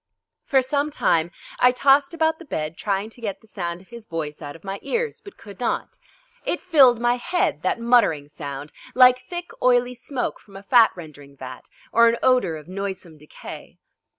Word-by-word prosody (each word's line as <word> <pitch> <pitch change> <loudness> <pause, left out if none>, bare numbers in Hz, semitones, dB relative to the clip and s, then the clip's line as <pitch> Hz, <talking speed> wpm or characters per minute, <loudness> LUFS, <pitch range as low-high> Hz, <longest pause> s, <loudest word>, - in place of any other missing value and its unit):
For 265 -2 +3
some 285 +3 0
time 170 - +1 0.3
I 250 - +6
tossed 275 +2 +4
about 320 -1 +1
the 335 - -11
bed 155 - -4
trying 200 +3 -2
to 240 - -13
get 205 -4 -4
the 220 - -22
sound 175 -4 -5
of 190 - -22
his 235 -2 -11
voice 155 -2 -5
out 145 -1 -7
of 165 - -15
my 195 0 -5
ears, 470 -1 -2
but 400 - -13
could 200 -3 -13
not. 245 - -3 0.4
It 350 - -1
filled 270 -9 +5
my 240 +1 +2
head, 245 - -1
that 185 - 0
muttering 230 -12 +3
sound, 145 -1 -7 0.2
like 250 0 +7
thick 350 0 -6
oily 245 0 +3
smoke 250 +1 -4
from 200 - -19
a 195 - -11
fat 230 +2 +6
rendering 145 -5 -12
vat 130 -1 -10 0.2
or 235 0 +6
an 230 - 0
odour 250 -11 +3
of 155 0 -10
noisome 190 -4 -6
decay. 150 - -11
225 Hz, 190 wpm, -23 LUFS, 165-255 Hz, 0.4 s, like